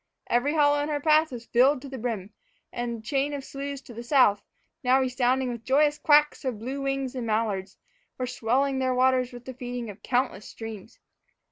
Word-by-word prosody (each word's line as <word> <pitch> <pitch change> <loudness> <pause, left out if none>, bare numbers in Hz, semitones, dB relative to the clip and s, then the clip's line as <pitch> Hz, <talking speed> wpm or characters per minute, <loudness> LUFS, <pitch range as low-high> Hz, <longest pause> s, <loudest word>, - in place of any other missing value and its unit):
Every 270 +6 +2
hollow 290 -1 +4
in 295 - -2
her 295 -1 -1
path 310 +1 +3
was 235 -2 -7
filled 255 +5 +4
to - - -7
the 265 -1 -7
brim, 220 -4 -4 0.4
and 240 -1 -3
the - - -11
chain 275 +4 0
of 275 - -6
sloughs 280 0 -6
to 245 - -13
the 230 - -7
south, 240 -5 +4 0.4
now 255 +1 +4
resounding 255 0 +1
with 235 -2 -6
the - - -40
joyous 295 +2 +3
quacks 300 0 +4
of 255 -5 -2
bluewings 270 +2 -3
and 250 -3 -4
mallards, 215 -3 -1 0.4
were 255 - -2
swelling 260 +3 0
their 260 -1 +1
waters 255 0 +2
with 245 0 -11
the 260 - -6
feeding 245 -3 -5
of 200 - -16
countless 250 -4 -1
streams. 225 -1 -9
255 Hz, 200 wpm, -26 LUFS, 235-275 Hz, 0.4 s, hollow